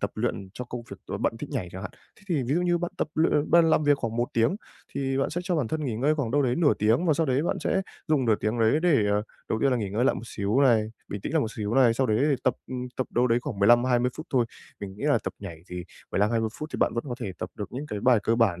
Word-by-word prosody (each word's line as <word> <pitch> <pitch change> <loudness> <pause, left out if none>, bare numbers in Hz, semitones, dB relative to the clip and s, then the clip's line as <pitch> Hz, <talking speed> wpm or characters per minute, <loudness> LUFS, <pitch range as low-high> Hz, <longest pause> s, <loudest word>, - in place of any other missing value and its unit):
tập - - -1
luyện 95 - -2
cho 125 - -5
công 120 0 -6
việc - - -7
ờ, - - -4
bạn - - 0
thích - - -7
nhảy 90 - -3
chẳng 95 - -7
hạn. - - -5 0.3
Thế - - -22
thì 160 -7 +1
ví 130 +4 0
dụ 175 - +2
như 175 -1 +2
bạn 175 0 -3
tập - - -1
luyện 155 -1 +2
bạn 170 -1 +6
làm 155 - +3
việc 145 -1 +4
khoảng 115 -3 -3
1 120 +1 0
tiếng 115 - +2 0.4
thì 135 -1 -1
bạn 135 - 0
sẽ 175 - -2
cho 180 -2 0
bản 135 -7 0
thân 155 +3 -2
nghỉ 125 -5 -2
ngơi 140 +6 +2
khoảng 140 -7 -2
đâu 145 +3 +2
đấy 125 -2 +1
nửa 165 -4 +4
tiếng, 115 - +2
và 160 - +4
sau 160 +2 +1
đấy 130 +1 +1
bạn 170 - 0
sẽ 190 - +1 0.3
dùng 145 -5 +2
nửa 110 - +4
tiếng 110 +3 -1
đấy 115 +7 +3
để, 145 -12 +4
ờ, 105 +1 +2 0.3
đầu 110 - 0
tiên 135 - +3
là 125 - +2
nghỉ 105 -5 -3
ngơi 110 +5 0
lại 135 - +3
một 90 - -6
xíu 105 +5 0
này, 115 -6 +4 0.2
bình 100 - -5
tĩnh 140 - -5
lại 160 - +3
một 110 - -2
xíu 105 +1 -2
này, 125 -4 +5
sau 130 +2 +1
đấy 110 -2 +2
thì 140 - +2
tập 130 - +3 0.4
tập 130 - -1
đâu 125 +1 +2
đấy 120 -1 +3
khoảng 125 -5 -5
15-20 120 +4 +4
phút 155 - -7
thôi. 125 -3 +2 0.3
Mình 95 -2 -6
nghĩ 110 - -6
là 145 -1 +4
tập - - -2
nhảy 95 -5 -7
thì 90 -1 -6 0.3
15-20 110 +2 +1
phút 155 - -5
thì - - -2
bạn - - +1
vẫn 115 - -2
có 125 - -3
thể 95 - -4
tập - - -5
được 100 -2 -5
những 140 +4 -5
cái 105 -5 -4
bài 125 +1 +5
cơ 115 - +2
bản 100 -7 +2
125 Hz, 305 wpm, -26 LUFS, 110-145 Hz, 0.4 s, bạn